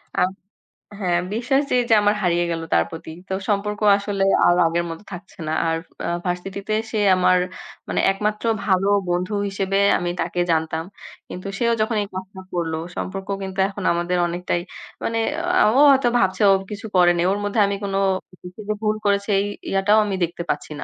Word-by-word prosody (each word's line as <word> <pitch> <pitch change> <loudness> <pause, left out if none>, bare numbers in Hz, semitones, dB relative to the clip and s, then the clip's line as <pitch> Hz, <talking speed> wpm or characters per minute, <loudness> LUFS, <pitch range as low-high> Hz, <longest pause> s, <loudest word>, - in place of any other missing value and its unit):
আম 180 - +2 0.7
হ্যাঁ, 180 -3 +1 0.2
বিশ্বাস 250 +5 +1
যেই 250 -1 +3
যে - - +5
আমার 205 +1 +3
হারিয়ে 175 -2 +1
গেল 165 -1 -2
তার 85 - +4
প্রতি। - - -8 0.2
তো - - -2 0.2
সম্পর্ক 210 0 -1 0.2
আসলে 200 -1 -2 0.2
আর 175 - +5
আগের 170 +1 0
মত 165 0 -6
থাকছে 190 +2 -10
না। 155 - -1
আর 165 0 +1 0.3
আ - - -2 0.2
ভার্সিটিতে 195 +3 -3 0.2
সে 220 - -1 0.2
আমার 185 0 +4 0.5
মানে - - 0
একমাত্র 210 +3 -2 0.2
ভালো 190 0 +2 0.2
বন্ধু 180 +3 -1
হিসেবে 195 0 -1 0.2
আমি 175 - -2
তাকে 180 - -3
জানতাম। 160 0 0 0.5
কিন্তু 185 +2 -7
সেও 235 +1 +2
যখন 220 +1 0
এই - - -7
কাজটা 190 +1 -7
করল 170 -2 -1 0.2
সম্পর্ক 195 +1 -5 0.2
কিন্তু 190 0 -6
এখন 200 0 -7
আমাদের 175 +1 -1
অনেকটাই 175 0 -2 0.4
মানে 230 - -1 0.5
আ - - +5
ও - - +6
হয়তো 270 -2 +3
ভাবছে 190 +1 +1
ও - - +7 0.2
কিছু 205 +1 -6
করেনি। 175 -1 +4
ওর 200 - -1
মধ্যে 205 +2 -1
আমি 200 0 -1
কোন 195 -1 -3 0.5
কিছু 180 +3 -11
যে - - +2
ভুল 215 0 +1
করেছি 200 +1 +1
এই 200 - 0 0.3
ইয়াটাও 195 +2 +3
আমি 200 - -2
দেখতে 170 0 -3
পাচ্ছি - - -2
না। - - -5
195 Hz, 185 wpm, -22 LUFS, 175-205 Hz, 0.7 s, ও